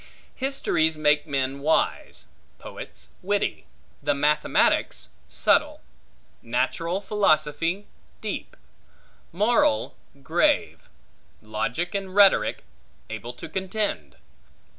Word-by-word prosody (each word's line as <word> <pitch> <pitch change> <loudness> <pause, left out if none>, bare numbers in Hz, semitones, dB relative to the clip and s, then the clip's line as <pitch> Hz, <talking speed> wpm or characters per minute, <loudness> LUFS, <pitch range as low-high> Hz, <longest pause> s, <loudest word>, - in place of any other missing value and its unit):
Histories 210 - 0
make 150 0 +2
men 135 -1 -1
wise; 155 +3 0 0.3
poets 65 +1 -9
witty; - - -1 0.3
the - - +1
mathematics 150 - +2 0.2
subtile; 70 -1 +2 0.6
natural 165 +10 -1
philosophy 170 -2 +1 0.3
deep; - - -5 0.7
moral 245 - +2 0.3
grave; - - +1 0.5
logic 110 - -2
and 195 -2 -4
rhetoric 200 -2 +5 0.5
able 120 - -5
to 125 - -9
contend. 185 - -3
160 Hz, 80 wpm, -25 LUFS, 135-195 Hz, 0.7 s, rhetoric